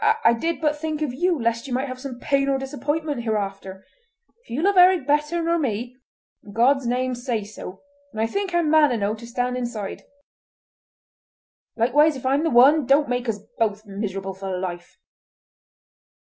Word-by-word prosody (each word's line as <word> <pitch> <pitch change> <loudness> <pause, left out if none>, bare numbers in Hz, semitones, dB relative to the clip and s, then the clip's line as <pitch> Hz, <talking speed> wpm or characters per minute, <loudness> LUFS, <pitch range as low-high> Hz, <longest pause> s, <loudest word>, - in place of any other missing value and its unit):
I - - +6
did 320 +6 -2
but 300 -1 +1
think 310 -1 -3
of 275 -5 -2
you 350 +3 0
lest 230 +2 -1
you 255 - -4
might 265 +2 -1
have 255 0 -8 0.2
pain 275 0 +1
or 270 - +2
disappointment 285 +1 -3
hereafter. 195 -4 -4 0.6
If - - -27
you 270 +7 -2
love 400 +1 +3
Eric 360 -5 +6
better 300 +4 +1
nor 335 +1 +1
me, 245 -2 -3 0.5
in 205 - -13
God's 255 +3 +3
name 255 +1 0
say 240 -3 -2
so, 195 -2 -10 0.3
and 220 - -7
I 220 - +2
think 395 - -2
I'm 345 -2 +1
man 310 -3 +5
enow 210 -3 0
to 230 +2 -9
stand 250 +1 -2
aside. 235 -5 -5 1.7
Likewise, 290 +7 +3
if 260 - -9
I'm 275 +3 +2
the 325 - +1
one, 265 +3 +5
don't 280 +1 +4
make 245 -1 -1
us 205 -2 -3 0.2
both 215 -1 0
miserable 195 -1 -4
for 190 -1 -5
life!" 175 -1 -6
250 Hz, 175 wpm, -23 LUFS, 220-295 Hz, 1.7 s, I